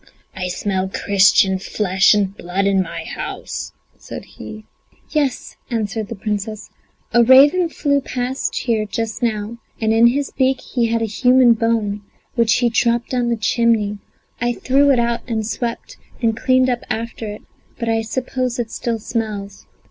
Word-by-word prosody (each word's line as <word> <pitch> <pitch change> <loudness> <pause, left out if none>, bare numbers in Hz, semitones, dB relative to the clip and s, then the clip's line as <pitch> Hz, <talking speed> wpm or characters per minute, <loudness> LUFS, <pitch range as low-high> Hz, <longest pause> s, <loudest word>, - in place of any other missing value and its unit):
I 185 -1 -3
smell 190 +1 -2
Christian 195 -1 +3
flesh 190 +1 +2
and 200 -1 0
blood 185 +2 -2
in 195 -1 +3
my 170 -2 -5
house," - - -6 0.3
said - - -8
he. 215 0 -10 0.5
"Yes," 285 -4 -1
answered 220 -2 -2
the 230 - -6
Princess, 210 +1 -4 0.4
"a 240 - +6
raven 285 +8 +6
flew 280 -3 0
past 255 0 -3
here 225 -3 0
just 220 +2 -4
now, 225 0 -2 0.2
and 220 -1 +1
in 230 +1 +6
his 275 +3 0
beak 260 0 +1
he 240 -3 -1
had 230 0 0
a - - +2
human 250 +3 +4
bone, 225 -3 0 0.3
which 230 -2 +3
he 245 -1 +2
dropped 235 0 +1
down 245 -2 0
the 235 - 0
chimney; 220 -2 +1 0.4
I 240 0 +1
threw 275 +4 +2
it 270 - +4
out 235 0 0
and 220 -3 -2
swept 230 +2 -4 0.2
and 225 -2 +1
cleaned 255 +2 +3
up 245 -2 0
after 230 0 -4
it, 210 0 -7 0.3
but 235 - -4
I 225 0 +1
suppose 250 +2 -2
it 235 -2 -3
still 235 -1 -2
smells." 210 -3 -5
230 Hz, 165 wpm, -19 LUFS, 210-245 Hz, 0.5 s, a